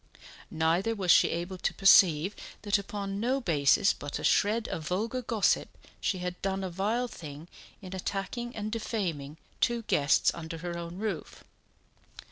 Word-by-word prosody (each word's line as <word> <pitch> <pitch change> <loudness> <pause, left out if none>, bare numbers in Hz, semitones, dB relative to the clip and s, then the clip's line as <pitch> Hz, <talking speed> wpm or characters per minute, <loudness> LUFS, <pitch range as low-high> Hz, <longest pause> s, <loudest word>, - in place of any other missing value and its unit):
Neither 170 +8 +1
was 185 -4 +2
she - - +6
able 175 +2 -4
to - - -1
perceive 190 -2 +5 0.3
that 205 -1 +2
upon 200 0 -5
no 255 +5 +1
basis 170 - +3
but 145 0 -6
a - - -7
shred 220 +2 +2
of 155 -1 -5
vulgar 225 +8 -1
gossip 225 -4 +1 0.3
she 190 - -1
had 180 0 -5
done 195 0 -1
a 185 - -4
vile 215 +7 0
thing 155 -6 -9 0.4
in 185 0 -8
attacking 200 +6 -4
and 215 0 -4
defaming 175 -10 -3 0.2
two 235 -1 +1
guests 145 -8 +3
under 165 0 -7
her 170 +1 -5
own 170 +1 -6
roof. 205 -5 -5
190 Hz, 155 wpm, -29 LUFS, 170-215 Hz, 0.4 s, she